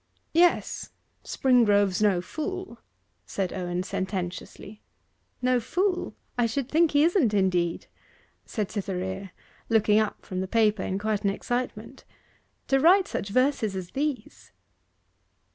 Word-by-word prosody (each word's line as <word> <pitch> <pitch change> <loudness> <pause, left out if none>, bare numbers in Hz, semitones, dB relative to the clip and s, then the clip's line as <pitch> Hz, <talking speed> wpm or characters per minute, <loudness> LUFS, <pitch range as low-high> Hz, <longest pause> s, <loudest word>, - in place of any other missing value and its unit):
'Yes 345 +2 +2 0.3
Springrove's 205 -7 +3
no 200 -4 +3
fool,' 370 - -5 0.5
said 190 -3 -2
Owen 180 -1 -2
sententiously. 190 +2 -5 0.6
'No 250 0 +3
fool! 360 - -1 0.2
I 235 - +4
should 260 +3 -3
think 330 +1 +4
he 290 +1 +5
isn't, 320 - +3
indeed,' 180 -3 +1 0.6
said 210 -4 -4
Cytherea, 190 -1 -4 0.4
looking 215 -2 +4
up 215 -1 -2
from 185 -1 -3
the 190 - -3
paper 215 -1 +2
in 190 - -2
quite 210 0 -1
an 200 - +3
excitement: 245 +5 -4 0.6
'to 270 - +3
write 365 +6 +5
such 200 - -4
verses 255 -3 +1
as 180 -2 -6
these! 285 -1 -4
215 Hz, 125 wpm, -26 LUFS, 190-270 Hz, 0.6 s, he